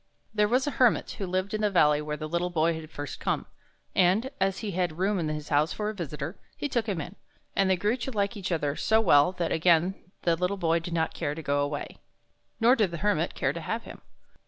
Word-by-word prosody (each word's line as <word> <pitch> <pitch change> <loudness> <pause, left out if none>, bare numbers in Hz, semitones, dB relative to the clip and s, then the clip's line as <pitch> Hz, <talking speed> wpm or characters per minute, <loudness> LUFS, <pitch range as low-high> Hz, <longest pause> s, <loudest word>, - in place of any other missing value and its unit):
There 210 -1 +3
was 250 +4 +2
a 290 - -1
Hermit 245 -4 +4
who 195 - -2
lived 185 +3 -1
in 215 - -1
the 210 - +3
valley 150 -6 +4
where 150 0 -4
the 155 - -5
little 175 +2 -1
Boy 165 -1 +2
had 160 -1 -7
first 145 -4 -6
come, - - -1 0.5
and, 195 +8 +3
as 195 0 +2
he 205 - -2
had 180 -2 -1
a - - -14
room 190 +3 +1
in 160 -3 -1
his 150 -1 -4
house 150 +2 +2
for 210 0 -2
a - - -9
visitor, 155 -5 -5 0.2
he - - -2
took 235 -5 -1
him 195 -5 -1
in, 175 +5 -6 0.4
and 195 -1 +3
they 190 - +4
grew 205 +6 +1
to 250 +2 -4
like 205 -3 -1
each 195 -3 -4
other 150 -4 0
so 220 +6 +3
well 160 -6 +5
that 175 -2 -2
again 170 +2 +3 0.3
the 170 -1 +3
little 180 +4 -1
Boy 165 -2 +2
did 170 +1 -5
not 160 -2 0
care 145 - -2
to 160 - -7
go 145 0 +1
away, 145 0 -4 0.6
nor 240 +3 +6
did 215 -7 +2
the 170 - -5
Hermit 210 - +1
care - - 0
to - - -5
have - - -3
him. - - -11
180 Hz, 250 wpm, -28 LUFS, 155-205 Hz, 0.6 s, nor